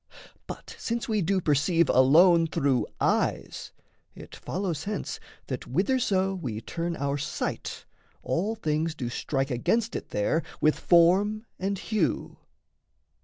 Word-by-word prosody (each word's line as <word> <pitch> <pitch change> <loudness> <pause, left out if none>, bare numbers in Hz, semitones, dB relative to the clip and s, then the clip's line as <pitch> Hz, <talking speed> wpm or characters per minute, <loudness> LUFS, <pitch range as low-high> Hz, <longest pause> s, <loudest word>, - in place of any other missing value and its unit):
But - - -8
since 235 +3 -2
we 215 -3 +1
do 190 +3 +1
perceive 165 +3 +2
alone 165 +6 +6
through 140 -5 +1
eyes, - - -1 0.4
It - - -11
follows 175 -5 -3
hence 205 -1 -4 0.3
that - - -5
whitherso 195 - +1
we 125 - -4
turn 170 +8 -4
Our 140 0 -2
sight, 145 - -4 0.4
all 205 +7 -1
things 160 -4 -1
do 125 -5 -4
strike 135 +2 -2
against 225 - 0
it - - -5
there 105 +11 0 0.2
With 155 0 +2
form 195 +6 +4
and 195 +1 -1
hue. 190 - -2
170 Hz, 125 wpm, -27 LUFS, 145-200 Hz, 0.4 s, alone